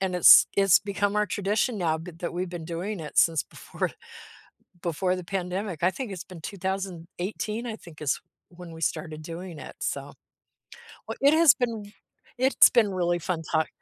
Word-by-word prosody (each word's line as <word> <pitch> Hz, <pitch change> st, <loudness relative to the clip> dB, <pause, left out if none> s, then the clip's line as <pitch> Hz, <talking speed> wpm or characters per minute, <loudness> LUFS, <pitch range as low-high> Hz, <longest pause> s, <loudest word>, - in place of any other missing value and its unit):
and 190 Hz, -1 st, -1 dB
it's 180 Hz, -, +9 dB
it's 195 Hz, -3 st, +6 dB
become 200 Hz, +1 st, -1 dB
our 210 Hz, 0 st, +2 dB
tradition 205 Hz, +4 st, 0 dB
now 160 Hz, -3 st, +1 dB
th 165 Hz, 0 st, -10 dB
that 175 Hz, -, -4 dB
we've 180 Hz, 0 st, -2 dB
been 175 Hz, -2 st, -6 dB
doing 180 Hz, +4 st, -4 dB
it 150 Hz, -, -8 dB
since 165 Hz, -2 st, +4 dB
before -, -, -5 dB, 0.9 s
before 180 Hz, +2 st, 0 dB
the 180 Hz, -, -6 dB
pandemic, 185 Hz, -1 st, -4 dB
I 185 Hz, -, +4 dB
think 255 Hz, -2 st, -6 dB
it's 185 Hz, -2 st, -6 dB
been 180 Hz, -4 st, -12 dB
2018, 190 Hz, +4 st, -4 dB
I 220 Hz, -, -4 dB
think 170 Hz, -7 st, -15 dB
is 145 Hz, -, 0 dB, 0.3 s
when 175 Hz, -1 st, -11 dB
we 165 Hz, 0 st, -10 dB
started 155 Hz, 0 st, -2 dB
doing 170 Hz, 0 st, -8 dB
it, -, -, -10 dB
so. -, -, -3 dB, 1.0 s
W -, -, -5 dB
it 285 Hz, +3 st, +5 dB
has 325 Hz, -5 st, +7 dB
been 245 Hz, -3 st, 0 dB
w 205 Hz, +1 st, -13 dB, 0.5 s
it's 265 Hz, +2 st, +6 dB
been 225 Hz, -5 st, +3 dB
really 175 Hz, -1 st, +1 dB
fun 170 Hz, 0 st, -3 dB
talk 160 Hz, 0 st, +2 dB
180 Hz, 180 wpm, -26 LUFS, 170-205 Hz, 1.0 s, it's